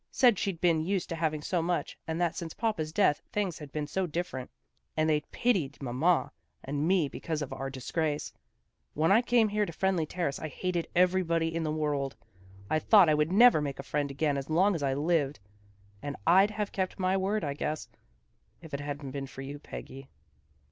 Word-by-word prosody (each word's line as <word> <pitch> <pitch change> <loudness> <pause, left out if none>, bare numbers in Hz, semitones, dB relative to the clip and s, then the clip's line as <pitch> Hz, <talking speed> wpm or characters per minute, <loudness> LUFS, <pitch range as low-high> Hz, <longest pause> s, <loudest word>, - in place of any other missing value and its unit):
Said 240 -6 +4
she'd 195 -5 -2
been 165 -3 +3
used 190 +1 -1
to 165 - -2
having 155 -2 -1
so 175 +1 0
much 175 +1 -1
and 160 +1 -2
that 175 -2 +1
since 165 -2 -6
papa's 210 -9 -1
death 160 -4 +3
things 195 -6 -1
had 150 -3 -9
been 150 0 -2
so 185 +5 -1
different, 155 -6 -4 0.5
and 155 0 +2
they 155 -1 +3
pitied 180 - 0
mamma 140 +7 +1 0.3
and 145 +3 -1
me 180 -5 +3
because 155 +2 -4
of 135 - -6
our 135 +1 -4
disgrace. 145 +3 -2 0.6
When 160 +4 +2
I 220 +4 +6
came 240 -3 +3
here 210 +1 +1
to 200 - -3
Friendly 180 -2 0
Ter 175 +1 -2
race 140 - -2
I 155 - -4
hated 175 +2 -2
everybody 170 -2 +2
in 165 - -1
the 155 -1 -1
world. 145 -3 -1 0.5
I 155 - +1
thought 195 -1 +6
I - - +5
never 180 +7 +5
would - - -2
make 140 -2 -3
a 140 - -6
friend 145 0 -1
again 140 +1 0
as 135 +1 -5
long 185 +6 +4
as'I 140 -5 0
lived. 150 -2 +1 0.6
And 145 -1 -4
I'd 190 +5 +6
have 210 -1 -3
kept 185 -1 -2
my 185 -1 +1
word, 195 +2 0
I 145 -2 -1
guess, 150 +1 -3 0.7
if 160 -3 -13
it 140 - -2
hadn't 145 -1 -5
been 135 0 -4
for 135 - -9
you, 140 +2 -7
Peggy." 135 -2 -9
160 Hz, 205 wpm, -29 LUFS, 145-185 Hz, 0.7 s, I